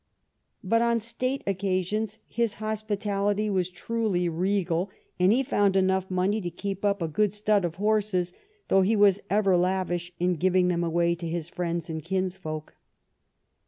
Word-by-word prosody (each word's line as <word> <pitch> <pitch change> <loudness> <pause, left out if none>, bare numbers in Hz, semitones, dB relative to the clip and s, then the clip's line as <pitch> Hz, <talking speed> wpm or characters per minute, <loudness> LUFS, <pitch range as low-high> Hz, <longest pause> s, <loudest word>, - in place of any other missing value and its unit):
But 230 0 +2
on 235 0 +2
state 255 +4 -3
occa 190 -1 0
sions 215 +2 -2
his 230 -3 -1
hospitality 210 -1 -1
was 185 -2 0
truly 195 -1 -1
regal, 180 +1 0 0.3
and 180 +2 +5
he 255 +4 +3
found 205 -6 +2
enough 190 0 +2
money 190 +4 +1
to 175 - -3
keep 195 +3 -5
up 200 -3 +1
a - - 0
good 205 +6 +1
stud 210 -1 +1
of 170 -1 -2
horses, 205 -3 +1 0.3
though 195 - +4
he 205 +4 +3
was 205 -2 +5
ever 195 -2 +3
lavish 175 -1 0
in 180 0 +1
giving 185 +1 +3
them 175 -1 0
away 170 +1 +2
to 170 0 -5
his 165 0 -3
friends 170 -1 -3
and 160 -2 -5
kins 185 +1 -1
folk. 155 -4 -6
190 Hz, 165 wpm, -27 LUFS, 175-210 Hz, 0.3 s, and